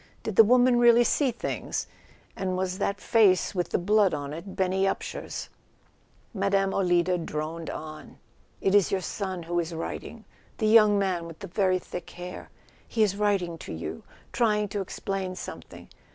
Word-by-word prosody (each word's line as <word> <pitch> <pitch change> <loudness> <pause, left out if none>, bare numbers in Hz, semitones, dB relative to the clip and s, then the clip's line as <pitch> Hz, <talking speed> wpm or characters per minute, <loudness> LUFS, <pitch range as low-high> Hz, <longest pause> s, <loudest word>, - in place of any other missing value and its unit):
Did 220 - -4
the 225 - +9
woman 245 +2 +4
really 240 0 +6
see 270 +4 +2
things, 235 - -3 0.5
and 185 -1 -2
was 185 0 -2
that 200 0 -1
face 210 -6 +3
with 180 -2 -1
the - - +1
blood 200 -1 +3
on 145 0 -5
it 175 +5 -8
Benny 190 +1 +1
Upsher's? 195 - -4 0.9
Mme. 195 -1 +1
Olida 175 -1 +2
droned 160 +1 -4
on. 155 0 -8 0.2
" - - -35
It 195 - +1
is 205 -3 +4
your 190 - 0
son 185 -2 -4
who 175 +1 -1
is 165 0 -3
writing 220 +7 -6 0.3
—the 220 - -1
young 215 -1 +6
man 185 -4 -1
with 165 -1 -10
the 195 - -8
very 185 0 +1
thick 180 0 -8
hair. 180 +1 -8 0.4
He 225 - +1
is 205 -3 +2
writ¬ 205 -2 +1
ing 170 -1 -6
to - - -7
you—trying 210 - -2
to 200 +1 -2
explain 190 0 -4
something. - - -9
190 Hz, 170 wpm, -27 LUFS, 175-210 Hz, 0.9 s, the